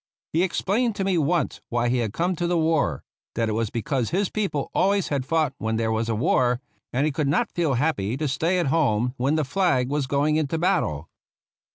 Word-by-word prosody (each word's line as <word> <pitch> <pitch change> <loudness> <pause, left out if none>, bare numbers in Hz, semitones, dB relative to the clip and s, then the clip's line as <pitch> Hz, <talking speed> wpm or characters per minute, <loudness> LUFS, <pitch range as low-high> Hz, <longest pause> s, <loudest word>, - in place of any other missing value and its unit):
He 165 - +3
explained 205 +5 0
to 195 - -2
me 190 -3 +1
once 160 -1 0
why 120 0 0
he 125 +1 +1
had 115 -4 -1
come 175 - 0
to 175 +1 -1
the 175 0 +1
war; 160 - +1 0.3
that 115 -1 0
it - - -1
was 110 0 -1
because 120 +2 -1
his 195 +2 0
peo 215 -2 -1
ple 145 -2 -3
always 200 0 +2
had 135 -3 -2
fought 155 -4 +1
when 110 0 -1
there 110 0 0
was 110 +1 -1
a 115 - 0
war, 125 +2 +2 0.3
and 135 +4 +1
he 155 - +1
could 145 +1 -1
not 215 +11 +1
feel 160 -6 0
happy 120 -5 0
to 155 +1 -1
stay 165 +7 0
at 175 - +1
home 125 -6 +1
when 135 +5 +1
the 155 -2 +1
flag 135 -6 +1
was 145 -1 -1
going 145 +3 +1
into 155 0 0
battle. 160 - 0
145 Hz, 225 wpm, -24 LUFS, 120-170 Hz, 0.3 s, He